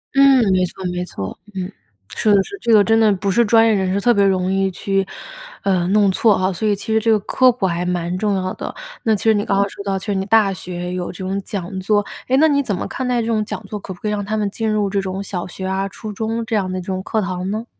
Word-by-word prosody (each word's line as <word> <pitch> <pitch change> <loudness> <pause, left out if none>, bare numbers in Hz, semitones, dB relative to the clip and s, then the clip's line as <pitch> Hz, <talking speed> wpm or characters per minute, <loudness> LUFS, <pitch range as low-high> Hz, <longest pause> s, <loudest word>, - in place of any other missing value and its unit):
嗯， 275 -1 +6
没 185 -1 +3
错 185 +2 -9
没 180 0 -3
错， 95 - -7 0.2
嗯， 185 +1 -4 0.4
是 210 - +2
的 195 - +4
是 400 - -9
这 235 -2 +2
个 205 -2 +7
真 225 +1 +3
的 220 -1 +5
不 195 +1 -1
是 235 +4 +3
专 225 +1 +5
业 225 - +4
人 190 -2 0
士 200 - 0
特 240 +3 +4
别 200 -2 +3
容 185 -1 +1
易 195 0 +1
去， 195 +1 -1 0.6
呃， 185 -3 +1
弄 200 0 +4
错 210 +1 +3
哈。 185 +1 +1
所 215 +4 -2
以 205 - +2
其 220 +3 -4
实 220 - +4
这 225 +1 0
个 220 - +5
科 255 +5 +3
普 235 -5 0
还 175 -1 -1
蛮 180 0 -1
重 205 0 0
要 185 0 -2
的。 - - -6 0.3
那 220 -1 +3
其 200 - -6
实 220 -1 +5
你 205 0 0
刚 195 - +1
刚 200 0 +2
说 - - -9
到， 195 -1 0
其 195 - -8
实 205 - 0
你 190 0 -1
大 210 -1 +4
学 180 0 -6
有 180 -1 -3
这 - - -13
种 195 +1 -2
讲 190 -2 -5
座， 205 +2 +1 0.2
哎， 260 - +2
那 315 - +6
你 285 -1 +3
怎 215 -7 -2
么 - - -4
看 260 -1 -4
待 245 -1 +1
这 225 - -3
种 220 -2 +1
讲 225 - -6
座？ 210 +1 -5
可 190 - -7
不 175 - -18
可 210 - -2
以 - - -1
让 205 -1 -2
他 215 +2 -2
们 210 -2 0
进 220 +1 -2
入 210 -2 +1
这 200 0 0
种 190 +1 -4
小 180 -3 -4
学 190 +1 -7
啊、 190 +1 -1
初 215 +2 -8
中 225 +2 -3
这 220 -1 0
样 190 -2 -1
的 185 - -3
这 175 - -11
种 185 -1 -2
课 215 +3 -1
堂 185 -1 -3
呢？ 220 +3 -3
200 Hz, 315 characters per minute, -19 LUFS, 185-220 Hz, 0.6 s, 个